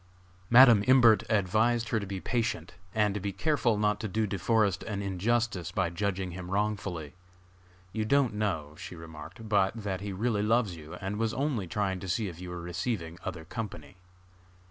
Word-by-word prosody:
Madam 120 -4 +8
Imbert 120 -4 +7
advised 110 +3 +2
her 110 - +1
to 100 - -6
be 95 -1 -4
patient, 115 -7 -2 0.2
and 105 -2 +2
to 105 - -2
be 100 +1 -3
careful 120 0 +1
not 105 0 +1
to 110 - -3
do 110 +2 0
De 100 -2 -3
Forest 105 -3 +2
an 100 -3 -3
injustice 100 -1 0
by 90 -4 0
judging 95 0 -2
him 90 0 -7
wrongfully. 95 -6 -2 0.8
"You 110 0 -1
don't 130 +1 +2
know," 95 -9 -2
she - - -8
remarked, 80 +6 -10
"but 100 0 +2
that 100 -4 -4
he 100 0 -4
really 105 +2 0
loves 110 -3 +2
you, 80 -1 -9
and 100 +1 -4
was 115 +3 -1
only 130 -9 -1
trying 95 +1 -1
to 95 - -7
see 105 +4 0
if 85 -1 -8
you 90 - -6
were 90 -1 -6
receiving 85 -1 -3
other 80 -4 -5
company." 90 -6 -7
100 Hz, 185 wpm, -29 LUFS, 90-110 Hz, 0.8 s, Madam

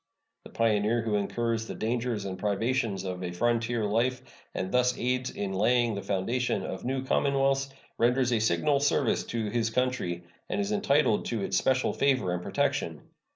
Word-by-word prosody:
The - - -10
pioneer 115 +1 +1
who 110 -2 -1
incurs 115 +2 -1
the - - -6
dangers 115 -2 -2
and 95 -1 -5
privations 105 0 0
of 90 -1 -4
a 90 - -2
frontier 115 +3 0
life, 120 +5 0 0.3
and 95 - -2
thus 125 0 +2
aids 125 +1 0
in 100 -1 -4
laying 120 +4 +2
the 100 - -4
foundation 115 +7 -1
of - - -5
new 130 +1 -1
commonwealths, 135 0 +1 0.3
renders 125 +1 +3
a 115 - +2
signal 110 - +2
service 145 +1 +2
to 110 -3 -3
his 115 -1 +1
country, 115 -8 -1 0.3
and - - -1
is 200 0 -1
entitled 150 - +2
to 115 -4 -2
its - - -1
special 130 -1 +2
favor 130 -10 +1
and 90 - -2
protection. - - -1
115 Hz, 170 wpm, -28 LUFS, 105-125 Hz, 0.3 s, renders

